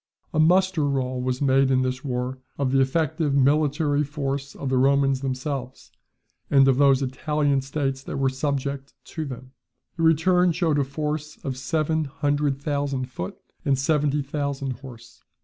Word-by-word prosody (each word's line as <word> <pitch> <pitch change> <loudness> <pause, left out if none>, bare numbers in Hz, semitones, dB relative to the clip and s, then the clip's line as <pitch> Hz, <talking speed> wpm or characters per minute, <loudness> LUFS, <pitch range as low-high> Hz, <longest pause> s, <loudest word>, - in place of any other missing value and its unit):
A 155 - +1
muster 180 +1 +4
roll 130 -2 -1
was 130 +2 -1
made 135 0 +4
in 130 -1 +3
this 130 0 -3
war 130 -1 -3 0.2
of 135 -2 0
the 135 - +3
effective 145 +1 0
military 145 +1 +2
force 140 -1 -4
of 135 - -4
the 130 -1 +2
Romans 135 0 +3
themselves, 130 -1 -4 0.6
and 135 -1 +5
of 130 -2 +4
those 140 -1 +4
Italian 140 +1 0
states 135 -1 -2
that - - -6
were 135 -1 +2
subject 140 0 -3
to 160 -2 -5
them. 130 -1 -8 0.5
The - - -3
return 175 +2 +4
showed 160 -4 +1
a - - +3
force 150 +2 -4
of 135 -2 -2
seven 155 +4 0
hundred 145 -1 -1
thousand 140 -3 -2
foot, 90 -6 -6 0.3
and 140 -1 +2
seventy 145 +1 +1
thousand 140 -2 -3
horse. 120 -4 -13
140 Hz, 160 wpm, -24 LUFS, 130-150 Hz, 0.6 s, and